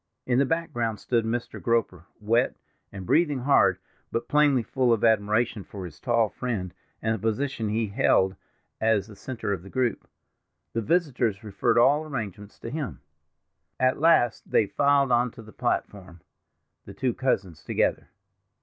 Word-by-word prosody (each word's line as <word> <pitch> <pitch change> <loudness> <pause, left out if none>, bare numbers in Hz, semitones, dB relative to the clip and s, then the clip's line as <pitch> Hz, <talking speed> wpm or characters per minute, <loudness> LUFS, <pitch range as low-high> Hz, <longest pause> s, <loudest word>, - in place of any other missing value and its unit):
In 125 0 +2
the 140 - +3
background 120 -10 -1
stood 115 -2 0
Mr. 120 +1 -3
Groper, 110 -8 0
wet, 115 +4 +1 0.4
and 95 -2 -8
breathing 145 - +2
hard, 140 +3 +4 0.3
but 115 - -2
plainly 145 -4 +3
full 125 +1 +1
of 115 -3 +1
admiration 110 0 +2
for 95 -1 -8
his 80 -4 -11
tall 115 -2 +2
friend, 100 -4 -4 0.3
and 110 0 +1
the 110 - -3
position 115 +1 -1
he 110 +2 0
held 95 -1 +2 0.4
as 110 -3 +2
the 105 -1 -13
center 110 -1 -4
of 95 - -4
the 95 - -12
group. 125 -2 -1 0.7
The 115 - -1
visitors 125 - 0
referred 105 +2 0
all 140 +6 +5
arrangements 105 - -6
to 115 - -6
him. 150 -3 -5 0.8
At 130 +1 +2
last 155 -7 +3
they 110 - +3
filed 140 +4 +2
on 120 +1 +3
to 115 - -11
the 110 -1 -14
platform—the 90 +1 -6
two 130 0 0
cousins 95 - -1
together. - - 0
115 Hz, 155 wpm, -26 LUFS, 105-130 Hz, 0.8 s, all